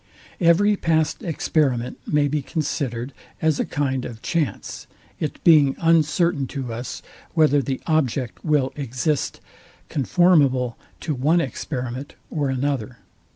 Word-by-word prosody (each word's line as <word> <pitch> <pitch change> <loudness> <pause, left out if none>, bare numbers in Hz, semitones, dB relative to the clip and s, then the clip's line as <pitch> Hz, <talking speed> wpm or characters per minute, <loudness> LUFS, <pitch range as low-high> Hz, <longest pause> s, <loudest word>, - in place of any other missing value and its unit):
Every 190 +5 +4
past 160 -4 0
experiment 140 -7 0
may 150 -1 +2
be 150 +1 -1
considered 135 -4 -3 0.3
as 155 -2 +1
a - - +1
kind 135 -3 -1
of 115 -3 -8
chance; 165 -5 -2 0.3
I - - +2
it 150 - -7
being 150 -5 +6
uncertain 165 -2 +2
to 125 -4 -4
us, 120 +3 -6 0.3
whether 150 -3 +4
the 135 -1 -3
object 135 -6 0
will 145 -4 +1
exist 135 +2 -2 0.5
conformable 140 -5 +3 0.3
to 155 - -2
one 150 +6 +2
experiment 130 -2 -4 0.2
or 145 -3 -1
another. 130 -2 -2
145 Hz, 125 wpm, -23 LUFS, 130-160 Hz, 0.5 s, being